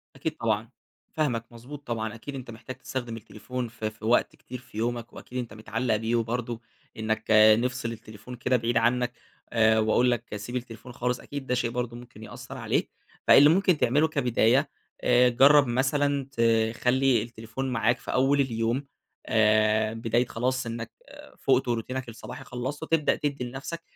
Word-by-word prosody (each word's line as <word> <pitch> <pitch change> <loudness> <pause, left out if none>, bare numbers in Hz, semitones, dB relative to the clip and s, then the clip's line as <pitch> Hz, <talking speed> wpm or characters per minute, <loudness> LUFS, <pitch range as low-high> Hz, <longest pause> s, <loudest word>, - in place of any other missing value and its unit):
أكيد 155 +4 -4
طبعًا، 110 0 -1 0.4
فاهمك، 125 -8 0
مضبوط 135 +5 -11
طبعًا، 110 -2 -3
أكيد 115 +5 -8
أنت 130 -3 -7
محتاج 115 +3 -9
تستخدم 120 -2 -5
التليفون 120 +3 -6
في 110 -2 -4
في 110 0 -12
وقت 120 +2 +2
كتير 125 0 -9
في 120 -3 -14
يومك 120 +1 -2
وأكيد 125 - -9
أنت 120 -4 -5
متعلق 110 +2 -1
بيه 110 +2 -1
وبرضه 120 0 -2 0.4
إنك 110 0 -1 0.4
نفْصِل 125 -1 -2
التليفون 110 +1 -10
كده 125 +1 +1
بعيد 115 0 0
عنك، 120 +1 +2 0.4
آآ، 110 -1 +4
وأقول 115 +3 +3
لك 115 -3 -3
سيب 105 +5 -6
التليفون 120 -1 -6
خالص، 125 0 -2
أكيد 140 -2 -7
ده 125 - +1
شيء 120 -1 0
برضه 120 0 -3
ممكن 120 -3 -12
يأثَّر - - -9
عليك، - - -1 0.4
فاللي 145 +2 +8
ممكن 180 0 +3
تعمله 145 +5 +3
كبداية، 135 -1 +2 0.3
آآ، 125 0 +5
جرَّب 140 +3 +6
مثلًا 140 +3 +1 0.5
تخلي 130 +1 +2
التليفون 115 +3 -5
معاك 120 0 +2
في - - -6
أول 135 +2 +3
اليوم، 120 +1 -1 0.4
آآ، 110 0 +3
بداية 115 +2 0
خلاص 130 +2 -1
إنك، 115 0 -5 0.2
آآ، - - -14
فُقت 130 -1 +2
وروتينك 120 +2 -3
الصباحي 115 - -9
خلصته، 130 +6 -5
تبدأ 160 -2 +2
تدِّي 140 -3 -3
لنفْسَك 135 +7 -6
120 Hz, 165 wpm, -27 LUFS, 115-130 Hz, 0.5 s, فاللي